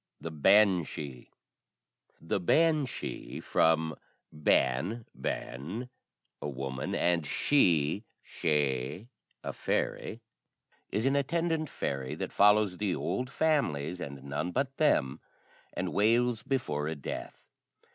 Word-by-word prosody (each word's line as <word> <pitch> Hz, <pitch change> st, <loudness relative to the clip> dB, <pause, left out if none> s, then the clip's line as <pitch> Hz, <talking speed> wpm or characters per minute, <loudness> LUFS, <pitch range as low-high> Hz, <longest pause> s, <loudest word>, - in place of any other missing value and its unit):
THE 85 Hz, -, -6 dB
BANSHEE. 85 Hz, -6 st, +2 dB, 0.9 s
[The 80 Hz, +4 st, -1 dB
banshee 155 Hz, -, +1 dB
(from 80 Hz, -1 st, +2 dB, 0.4 s
ban 75 Hz, -, +1 dB
[bean], 80 Hz, -, -4 dB, 0.5 s
a -, -, -3 dB
woman, 65 Hz, -1 st, -4 dB
and 85 Hz, -1 st, +2 dB
shee 90 Hz, -, +2 dB, 0.2 s
[sidhe], 75 Hz, -, -1 dB, 0.3 s
a -, -, -4 dB
fairy) -, -, -2 dB, 0.7 s
is 110 Hz, +4 st, -1 dB
an 135 Hz, +1 st, +3 dB
attendant 160 Hz, +2 st, 0 dB
fairy 70 Hz, +1 st, -3 dB
that -, -, -5 dB
follows 105 Hz, -2 st, +4 dB
the 100 Hz, -4 st, 0 dB
old 110 Hz, +9 st, -2 dB
families, 90 Hz, -, 0 dB
and 70 Hz, -1 st, -7 dB
none 70 Hz, +6 st, -3 dB
but 135 Hz, +5 st, -1 dB
them, 70 Hz, -, +2 dB, 0.5 s
and -, -, -3 dB
wails 115 Hz, +2 st, +3 dB
before 120 Hz, -, -1 dB
a 80 Hz, -, -2 dB
death. 70 Hz, -, -7 dB
90 Hz, 105 wpm, -30 LUFS, 75-125 Hz, 0.9 s, follows